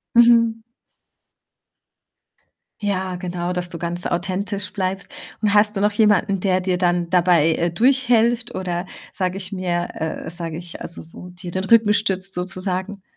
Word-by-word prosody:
Mhm. 230 Hz, -1 st, +5 dB, 2.2 s
Ja, 190 Hz, -3 st, -1 dB
genau, 180 Hz, 0 st, -3 dB
dass 180 Hz, 0 st, -2 dB
du 170 Hz, -1 st, -7 dB
ganz 175 Hz, +1 st, -2 dB
authentisch 195 Hz, +3 st, -2 dB
bleibst 190 Hz, -1 st, -3 dB, 0.3 s
und 210 Hz, -2 st, +2 dB
hast 210 Hz, 0 st, +4 dB
du 195 Hz, -, 0 dB
noch 210 Hz, 0 st, +2 dB
jemanden, 205 Hz, -2 st, +2 dB
der 185 Hz, -1 st, +1 dB
dir 185 Hz, -1 st, 0 dB
dann 175 Hz, -1 st, +1 dB
dabei, 175 Hz, -3 st, +4 dB
äh, 170 Hz, +1 st, 0 dB
durchhilft 240 Hz, +1 st, +2 dB
oder 180 Hz, -1 st, -3 dB, 0.3 s
sage 185 Hz, -1 st, -2 dB
ich 195 Hz, 0 st, -6 dB
mir 175 Hz, -2 st, -1 dB
äh, 160 Hz, 0 st, -4 dB
sage 165 Hz, -2 st, -2 dB
ich 175 Hz, -1 st, -8 dB
also 170 Hz, -, -7 dB
so, 170 Hz, +2 st, -4 dB
dir 180 Hz, 0 st, -8 dB
den 190 Hz, 0 st, -2 dB
Rücken 215 Hz, 0 st, +5 dB
stützt, 195 Hz, -2 st, -1 dB
sozusagen? 185 Hz, +2 st, -3 dB
185 Hz, 150 wpm, -21 LUFS, 175-205 Hz, 2.2 s, Mhm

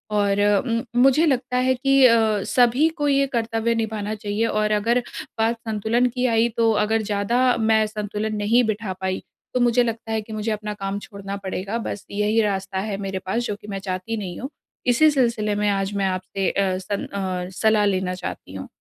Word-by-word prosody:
और 200 Hz, -1 st, +2 dB
उम, 215 Hz, +3 st, +2 dB, 0.2 s
मुझे 270 Hz, +5 st, +5 dB
लगता 255 Hz, -3 st, 0 dB
है 255 Hz, +1 st, +3 dB
कि 270 Hz, +1 st, +4 dB
अ, 220 Hz, -4 st, +4 dB
सभी 250 Hz, +8 st, +3 dB
को 290 Hz, -, 0 dB
ये 275 Hz, -1 st, +3 dB
कर्तव्य 230 Hz, -2 st, 0 dB
निभाना 215 Hz, -2 st, -2 dB
चाहिए 210 Hz, +1 st, -2 dB
और 215 Hz, -1 st, 0 dB
अगर 230 Hz, +4 st, +2 dB, 0.4 s
बात 225 Hz, +1 st, +2 dB
संतुलन 220 Hz, +3 st, +1 dB
की 250 Hz, +1 st, -2 dB
आई, 230 Hz, -1 st, +3 dB
तो 230 Hz, -1 st, +4 dB
अगर 220 Hz, +1 st, +1 dB
ज़्यादा 220 Hz, +5 st, +1 dB
मैं 220 Hz, -1 st, +3 dB
संतुलन 210 Hz, 0 st, -3 dB
नहीं 220 Hz, +4 st, +3 dB
बिठा 215 Hz, -3 st, -2 dB
पाई, 190 Hz, 0 st, -2 dB, 0.3 s
तो 250 Hz, -, +1 dB
मुझे 245 Hz, 0 st, +4 dB
लगता 230 Hz, -1 st, -4 dB
है 220 Hz, -1 st, 0 dB
कि 220 Hz, +1 st, -10 dB
मुझे 215 Hz, +1 st, -2 dB
अपना 210 Hz, 0 st, -3 dB
काम 200 Hz, 0 st, -4 dB
छोड़ना 200 Hz, -1 st, -7 dB
पड़ेगा, 195 Hz, +3 st, -3 dB
बस 220 Hz, -3 st, -5 dB
यही 210 Hz, +2 st, +2 dB
रास्ता 195 Hz, -2 st, -1 dB
है 195 Hz, -, -2 dB
मेरे 190 Hz, -1 st, -3 dB
पास 210 Hz, +6 st, 0 dB
जो 210 Hz, -, -2 dB
कि -, -, -12 dB
मैं 195 Hz, -1 st, -4 dB
चाहती 190 Hz, +3 st, -4 dB
नहीं 185 Hz, -5 st, -5 dB
हूँ। 265 Hz, -, -5 dB, 0.4 s
इसी 275 Hz, +6 st, +5 dB
सिलसिले 230 Hz, -6 st, +1 dB
में 205 Hz, 0 st, +1 dB
आज 195 Hz, 0 st, -1 dB
मैं 200 Hz, -1 st, 0 dB
आपसे 185 Hz, 0 st, -1 dB
अ, 190 Hz, -2 st, 0 dB
सन 190 Hz, +2 st, -4 dB
अ, 185 Hz, -2 st, -3 dB
सलाह 215 Hz, -1 st, +3 dB
लेना 185 Hz, -2 st, 0 dB
चाहती 180 Hz, -, -7 dB
हूँ। 95 Hz, -1 st, -7 dB
215 Hz, 200 wpm, -23 LUFS, 200-235 Hz, 0.4 s, मुझे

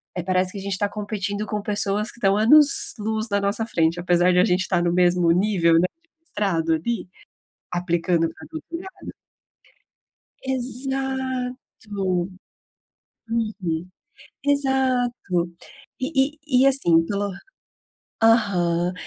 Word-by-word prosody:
eh, 180 Hz, -, -3 dB
parece 185 Hz, 0 st, 0 dB
que 205 Hz, -, -8 dB
a -, -, -7 dB
gente 195 Hz, -1 st, -3 dB
tá 205 Hz, 0 st, 0 dB
competindo 205 Hz, 0 st, -4 dB
com 210 Hz, -1 st, -3 dB
pessoas 205 Hz, +1 st, 0 dB
que -, -, -16 dB
estão 195 Hz, -1 st, +3 dB
anos-luz 220 Hz, -4 st, +4 dB
na 200 Hz, -, +2 dB
nossa 200 Hz, +3 st, +2 dB
frente, 165 Hz, -5 st, +1 dB
apesar 175 Hz, 0 st, +3 dB
de 180 Hz, -, +4 dB
a 185 Hz, -, +5 dB
gente 180 Hz, -2 st, +1 dB
estar 175 Hz, -2 st, 0 dB
no 170 Hz, -, +1 dB
mesmo 175 Hz, -1 st, +3 dB
nível, 175 Hz, -3 st, +3 dB
né, 175 Hz, +2 st, +4 dB, 0.2 s
de 330 Hz, -, -37 dB, 0.2 s
mestrado 170 Hz, -, 0 dB
ali, 200 Hz, +7 st, -2 dB, 0.7 s
aplicando 170 Hz, -1 st, 0 dB
pra -, -, -13 dB
doutorado 335 Hz, +4 st, -8 dB, 1.3 s
Exato! 260 Hz, 0 st, -3 dB, 1.7 s
Uhum. 195 Hz, -7 st, -2 dB, 0.6 s
Exato. 255 Hz, -10 st, 0 dB, 0.5 s
E 270 Hz, +1 st, 0 dB
e 275 Hz, -3 st, +1 dB
e, -, -, +5 dB
assim, 175 Hz, -12 st, +3 dB
pelo 200 Hz, -1 st, -2 dB, 0.9 s
aham. 180 Hz, -6 st, +2 dB
205 Hz, 125 wpm, -23 LUFS, 180-250 Hz, 1.7 s, a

